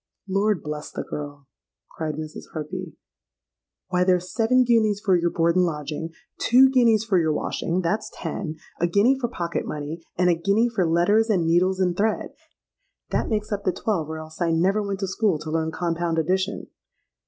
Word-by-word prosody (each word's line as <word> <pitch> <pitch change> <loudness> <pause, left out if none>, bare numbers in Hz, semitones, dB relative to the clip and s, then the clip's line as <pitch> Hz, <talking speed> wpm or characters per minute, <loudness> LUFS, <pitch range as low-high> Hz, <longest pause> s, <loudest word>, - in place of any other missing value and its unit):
'—'Lord 195 -1 +1
bless 150 0 -5
the - - -5
girl!' 145 -1 -7 0.4
cried 155 -2 -4
Mrs. 155 0 -8
Harpy. 170 +3 -5 1.0
'Why, 180 0 +2
there's 180 0 +1
seven 250 +3 +3
guineas 220 -4 +2
for 195 -3 +2
your 170 0 +2
board 170 0 +1
and 185 - +4
lodging; 155 -1 -3 0.3
two 260 +3 +6
guineas 230 -4 +4
for 195 -5 +3
your 160 -2 +1
washing; 170 +3 -1
that's 185 +5 -1
ten; 160 -6 -5 0.2
a 175 - +2
guinea 215 +10 +3
for 245 - -1
pocket 170 -8 -3
money; 150 +2 -5 0.2
and 180 0 +3
a - - +4
guinea 200 +8 +2
for 195 -7 0
letters 205 +7 +3
and 185 -6 +2
needles 180 +3 +2
and 180 -2 +1
thread; 215 +3 -1 0.8
that - - 0
makes 210 -2 -2
up 205 -1 -2
the 185 - +2
twelve, 175 -6 -2
or 160 - -4
else 155 +2 -10
I 170 - +2
never 185 +6 +2
went 200 -1 -4
to 195 - -1
school 190 -2 +1
to 155 +1 -7
learn 160 0 0
compound 170 0 -2
addition.' 185 +4 0
180 Hz, 185 wpm, -24 LUFS, 165-210 Hz, 1.0 s, two